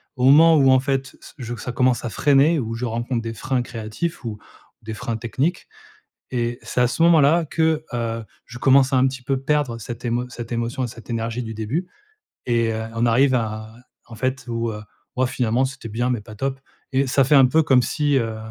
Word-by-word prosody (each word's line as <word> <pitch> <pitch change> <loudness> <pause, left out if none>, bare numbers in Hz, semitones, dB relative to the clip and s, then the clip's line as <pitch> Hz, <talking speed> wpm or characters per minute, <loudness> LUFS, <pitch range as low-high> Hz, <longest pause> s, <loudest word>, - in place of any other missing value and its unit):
au 125 0 0
moment 160 +4 +7
où, 135 -3 +5
en 130 - +5
fait, 135 0 -2
ç - - -14
je 120 -2 -6
veux 120 - -3
que - - -9
ça 125 - -5
commence 125 -1 +1
à - - -2
freiner, 145 +5 +3
où 115 -2 -3
je 125 +2 -3
rencontre 120 +1 -2
des 115 0 -5
freins 130 +2 -1
créatifs 120 +7 -5
ou 105 -3 -5 0.4
des 110 0 -6
freins 115 0 -4
techniques 130 - -2 0.6
et 120 -1 -2
c'est 125 - -2
à 125 - +4
ce 145 - -3
moment-là 165 0 +5
que, 160 0 0
heu, 115 -1 -2 0.2
je 120 - -10
commence 135 +1 +4
à 130 - +3
un 130 +1 +4
petit 135 -1 -5
peu 135 0 -1
perdre 140 -4 0
cette 115 +2 -8
émo 120 +1 -1
cette 120 -1 -8
émotion 120 +2 -2
et - - -1
cette 115 +1 -13
énergie 115 +1 -2
du 110 -1 -6
début 125 - -3 0.6
et 115 -2 +1
heu, 110 0 -3
on 115 +1 0
arrive 130 +3 +3
à 110 -1 -3 0.3
en 115 - -13
fait, 130 +2 -2
où, 115 -1 -2
heu, 105 0 -7 0.3
«Waouh! 130 0 +2
finalement 125 0 0
c'était 130 -4 -7
bien, 120 +4 -1
mais 115 -4 -2
pas 110 0 -12
top!» 135 +3 -3 0.3
et 135 0 +2
ça 135 +1 +3
fait 145 +4 +1
un 135 -2 +7
peu 160 +4 +3
comme 130 -3 +4
si, 145 +1 0
heu, 115 -2 -2
125 Hz, 225 wpm, -22 LUFS, 115-135 Hz, 0.6 s, moment